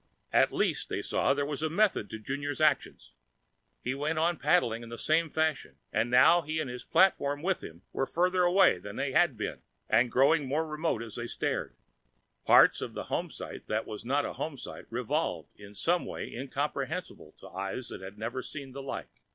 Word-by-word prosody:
At - - +5
least, - - 0
they - - -2
saw, 135 - +1
there 145 0 0
was 145 0 -3
method 160 - +1
in 110 -1 -7
Junior's 140 +3 -3
actions. - - +1 0.7
He 130 - -1
went 150 +4 -2
on 165 +1 +2
paddling 115 -10 +2
in 115 - -9
the 115 - -7
same 160 +4 +2
fashion 160 -1 -1 0.2
and 115 - +1
now 130 +8 +6
he, 155 0 -3
and 155 - -2
his 125 -1 -6
platform 145 -6 +3
with 190 0 0
him, 85 +3 -10
were 135 - -1
farther 180 +2 +2
away 180 - +5
than 100 +3 -8
they 135 - -1
had 165 -5 +3
been, 105 - -4 0.3
and 120 +2 +3
growing 140 +2 +4
more 155 +4 0
remote 155 -4 -1
as 110 -3 -9
they 120 0 -4
stared. - - -2 0.7
Parts - - +7
of - - -5
the - - -6
homesite - - -4
that 110 +1 -1
was 105 -1 -7
not 140 +4 +1
a - - -4
homesite 145 -5 -6
revolved 130 +7 -2
in 100 0 -13
some 175 - +1
way - - -6
incomprehensible 140 - -4
to - - -13
eyes 95 +6 -4
that - - -7
had 95 +2 -9
never 115 +4 -3
seen 135 0 -8
the 140 +2 -7
like. 135 - -7
140 Hz, 190 wpm, -30 LUFS, 115-160 Hz, 0.7 s, Parts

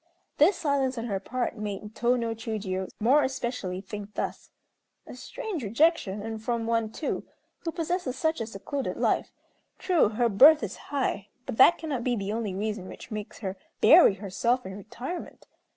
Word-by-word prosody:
This 340 +7 +6
silence 275 -5 0
on 230 - -3
her 200 -4 -2
part 245 +4 -3
made 210 0 -5
Tô 240 +2 +2
no 230 -1 -1
Chiûjiô, 210 -5 -3
more 255 +7 +5
especially, 240 -8 -3
think 205 +1 -8
thus: - - -4 0.6
"A - - -10
strange 410 - -5
rejection; 225 - +2
and 220 0 -5
from 235 -1 -1
one, 230 -1 0
too, 300 - -3 0.4
who 330 - -4
possesses 330 -5 -2
such 315 -3 0
a 225 - -3
secluded 225 +6 -4
life. - - +1 0.5
True, 350 - +3
her 235 +3 +1
birth 275 +7 +7
is 195 - -4
high; 260 -8 -1 0.2
but - - -5
that 265 - +7
cannot 285 -7 -3
be 245 -1 +1
the 200 -1 -3
only 220 -4 -2
reason 205 -1 -3
which - - -11
makes 215 0 -6
her 190 0 -3 0.2
bury 310 - +7
herself 230 +6 -1
in 190 0 -6
retirement. 245 - -7
230 Hz, 170 wpm, -27 LUFS, 210-275 Hz, 0.6 s, birth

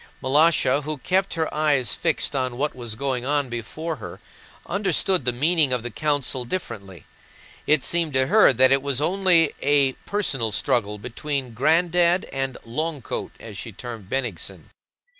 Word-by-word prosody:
Malásha, 145 0 +3
who 150 +1 -4
kept 185 +8 0
her 160 -1 -2
eyes 150 -5 +2
fixed 160 -3 -1
on 130 -2 -1
what 150 +3 -1
was 120 -3 -5
going 130 0 -2
on 140 0 0
before 155 +7 -5
her, - - -9 0.5
understood 190 -4 +1
the 125 - +3
meaning 150 +3 +2
of 125 -2 -1
the 120 - -5
council 145 -2 -1
differently. 100 - -6 0.6
It 150 -2 +3
seemed 170 -3 +1
to 130 0 +3
her 215 +8 +6
that 130 +1 +5
it 135 0 +4
was 140 -2 -1
only 175 -1 +3
a 140 -2 +3
personal 135 - 0
struggle 105 -1 0
between 125 +3 -4
"Granddad" 170 - +2
and 135 -1 -2
"Long 150 +3 -3
coat" - - -4
as - - -9
she - - -6
termed 115 -6 -9
Bennigsen. 120 -10 -4
140 Hz, 160 wpm, -23 LUFS, 125-160 Hz, 0.6 s, her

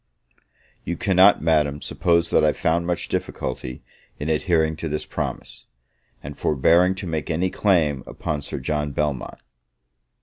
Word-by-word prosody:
You 85 - -3
cannot, 95 -1 +4
Madam, 75 -3 +2
suppose 85 +2 0
that - - +4
I 75 -1 +4
found 85 +2 0
much 90 -1 -2
difficulty 65 0 -4 0.3
in 75 - -4
adhering 80 0 +1
to 80 0 -4
this 75 +1 -3
promise, - - -6 0.6
and 70 +1 -7
forbearing 85 +7 +3
to 95 - -6
make 80 -2 -3
any 90 +3 0
claim 80 -9 +1
upon 75 -1 -4
Sir - - -6
John 75 +2 -2
Belmont. 75 -2 -2
80 Hz, 140 wpm, -23 LUFS, 75-85 Hz, 0.6 s, cannot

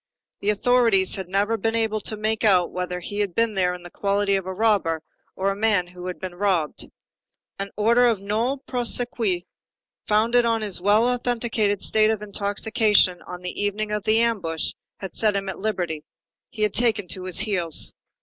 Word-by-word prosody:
The 200 - -1
authorities 225 -3 +3
had 190 -2 -4
never 205 +4 +1
been 225 +2 -1
able 220 -1 0
to 215 - -3
make 215 +1 -1
out 185 -5 +4
whether 180 0 -3
he 205 +4 -5
had 200 -4 -1
been 230 -1 +2
there 180 -2 +1
in 180 - -12
the 175 - -10
quality 200 0 0
of 190 -1 -3
a - - -3
robber 190 -7 +1 0.3
or 195 +1 0
a - - -3
man 205 -3 +2
who 180 0 -10
had 180 - -5
been 185 -2 -6
robbed. 175 -5 -1 0.7
An 200 0 -3
order 235 +3 +4
of 230 -3 +2
nolle 220 +7 -1
prosequi, 240 -6 +2 0.6
founded 230 +3 +3
on 230 -1 +1
his 200 -4 -2
well 210 +5 +4
authenticated 235 -4 0
state 215 0 +3
of 220 -1 -1
intoxication 205 -1 +1
on 180 0 -8
the 180 - -5
evening 210 +1 -2
of 210 0 -1
the 215 +1 +3
ambush, 190 -9 0 0.3
had 190 -3 -7
set 215 -2 +1
him 195 0 -2
at 190 - -6
liberty. 180 -7 -2 0.5
He 215 - -4
had 210 - +1
taken 225 -5 +1
to 185 -2 -2
his 185 -2 -4
heels. 185 -7 -1
205 Hz, 190 wpm, -23 LUFS, 185-225 Hz, 0.7 s, out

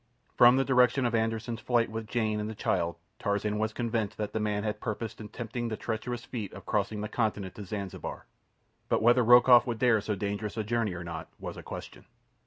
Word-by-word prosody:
From 120 +1 +7
the 135 - +2
direction 125 0 +4
of 120 - 0
Anderssen's 115 +1 -1
flight 120 -3 +1
with 110 0 -5
Jane 110 -2 0
and 105 +1 -3
the 110 - -6
child 85 -4 0 0.2
Tarzan 105 +1 -1
was 110 0 0
convinced 115 -3 -2
that 105 -1 -3
the 110 - 0
man 105 -1 -1
had 105 -1 -2
purposed 115 0 -4
attempting 115 +2 -5
the 110 -2 -3
tremendous 120 +2 -4
feat 115 -7 -5
of - - -10
crossing 105 0 -1
the 105 - -2
continent 105 -5 -1
to 105 - -8
Zanzibar; 100 -1 -6 0.6
but - - +2
whether 120 +2 +6
Rokoff 120 +1 +7
would 120 -2 -2
dare 115 -3 +3
so 105 0 -2
dangerous 100 +2 -3
a 110 - 0
journey 110 -3 -1
or 90 - -6
not 85 -1 -6
was - - -6
a - - -8
question. - - -9
110 Hz, 205 wpm, -29 LUFS, 105-120 Hz, 0.6 s, From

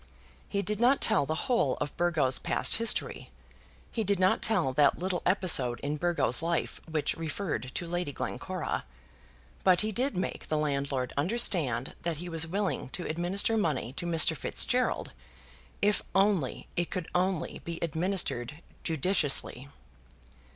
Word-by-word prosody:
He 200 -1 -1
did 210 0 -2
not 250 +4 +4
tell 140 - +4
the 160 +2 -2
whole 235 - +1
of 145 - -3
Burgo's 160 -7 +1
past - - +1
history. 230 -1 +1 0.6
He 225 - -1
did 200 -1 +1
not 185 0 +3
tell 180 -12 +2
that 145 +1 +4
little 180 0 -2
episode 165 -10 +4
in 145 +2 -2
Burgo's 175 +2 0
life 170 0 -2
which 155 -2 0
referred 160 - -3
to 175 - -2
Lady 175 -2 -2
Glencora. 155 +6 -4 0.8
But 185 -2 +5
he 215 0 -1
did 245 0 -1
make 185 - -3
the 155 - 0
landlord 140 -3 -1
understand 150 - +1
that 170 -2 -2
he 175 +3 -6
was 165 -1 +1
willing 195 -4 -2
to 175 - -6
administer 180 +7 0
money 150 - -1
to 175 +4 -4
Mr. 165 -1 +3
Fitzgerald, 250 +9 0 0.7
if 205 0 +3
only 195 -8 +2
it 175 -1 -1
could 185 -3 -4
only 180 -2 0
be 170 0 -5
administered 160 -4 -1 0.2
judiciously. 145 -5 -1
170 Hz, 145 wpm, -29 LUFS, 145-195 Hz, 0.8 s, But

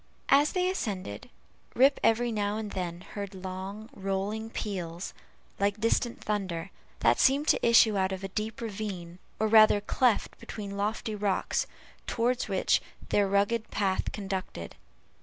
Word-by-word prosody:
As 285 +2 +5
they 365 -1 +1
ascended, 195 - -3 0.5
Rip 270 +3 +5
every 230 +2 +3
now 205 -1 -1
and 215 -2 -4
then 175 -2 -4
heard 200 0 -7
long 190 +3 -6
rolling 200 +1 -2
peals, 180 -6 -4 0.5
like 200 +1 +1
distant 230 +1 0
thunder, 190 -4 -2 0.3
that - - +4
seemed 280 +3 +4
to - - +3
issue 230 -2 +6
out 190 0 +1
of 190 0 -4
a - - -2
deep 215 +4 -4
ravine, 195 -5 -5 0.2
or 220 - +2
rather 215 -1 +7
cleft 230 +3 +1
between 200 -2 -6
lofty 215 +2 -2
rocks, 205 -2 0 0.4
toward 245 +2 +1
which - - +2 0.3
their 200 -1 +3
rugged 205 +3 +1
path 195 -2 0
conducted. 190 - -5
205 Hz, 140 wpm, -29 LUFS, 190-225 Hz, 0.5 s, rather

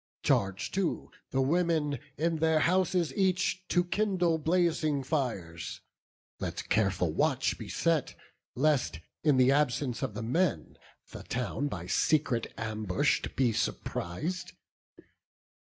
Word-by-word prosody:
Charge 95 0 +1
too 190 -3 -2 0.2
the 135 - +1
women, 160 -1 +1 0.2
in 165 +1 +1
their 160 0 +3
houses 180 -3 +2
each, 185 -1 +1
To 175 - +2
kindle 180 -3 +1
blazing 160 -3 +1
fires; 95 - -3 0.6
let - - -4
careful 95 -6 +1
watch - - +1
Be - - -7
set, 165 -4 0 0.4
lest, 135 - +1 0.2
in 150 -4 +4
the 130 +1 +5
absence 140 -3 +1
of 105 - -3
the 110 - -4
men, 125 - 0 0.3
The - - -8
town 125 +4 -2
by - - -5
secret 140 -7 +1
ambush 110 -4 0
be 125 -4 +2
surpris'd. 155 - -3
150 Hz, 120 wpm, -30 LUFS, 115-170 Hz, 0.6 s, the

